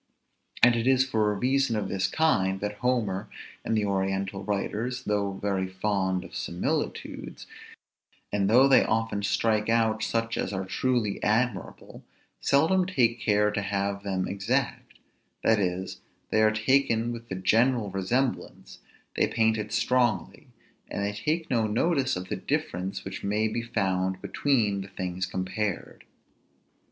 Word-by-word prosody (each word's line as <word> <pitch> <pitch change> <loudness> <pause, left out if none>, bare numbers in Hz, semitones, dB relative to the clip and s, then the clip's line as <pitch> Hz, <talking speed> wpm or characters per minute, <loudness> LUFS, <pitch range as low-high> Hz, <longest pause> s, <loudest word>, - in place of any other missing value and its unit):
And 120 0 +7
it 115 +1 -1
is 130 0 +4
for 110 -5 +1
a - - -2
reason 130 +1 +1
of 105 -2 -1
this 95 -1 0
kind, 95 -9 +1
that 105 +1 -4
Homer 115 -6 0 0.3
and 110 - 0
the 105 - +1
oriental 95 0 -1
writers, 110 +5 -2
though 100 -2 0
very 95 -1 -1
fond 95 -1 -1
of - - -11
similitudes, - - -3 0.9
and 100 -1 +1
though 125 +5 +6
they 135 - +6
often 110 -2 0
strike 110 +1 +1
out 110 -1 +2
such 115 0 -1
as 95 - -2
are 95 0 -2
truly 115 +1 -1
admirable, 110 -1 -1 0.4
seldom 175 +6 +3
take 120 -10 +2
care 105 -1 +2
to 105 0 -2
have 100 0 -2
them 95 -2 -2
exact; 120 +7 -2 0.5
that 110 -1 +4
is, 95 -1 -2 0.3
they 110 - +3
are 110 - +6
taken 115 +1 +2
with 115 0 -9
the 95 - -3
general 110 +3 +2
resemblance, 120 +8 -2 0.4
they - - +2
paint 110 -1 +2
it 105 0 -5
strongly, 120 -3 0 0.4
and 100 - -2
they 105 - -2
take 155 +10 -1
no 115 -3 +2
notice 130 +4 +1
of 90 0 -5
the - - -2
difference 95 +2 -3
which 95 0 -6
may 105 +2 +1
be 115 +2 -2
found 95 -5 -1
between 110 -9 0
the 95 - -7
things 95 0 -3
compared. 95 +2 -4
105 Hz, 150 wpm, -27 LUFS, 95-120 Hz, 0.9 s, And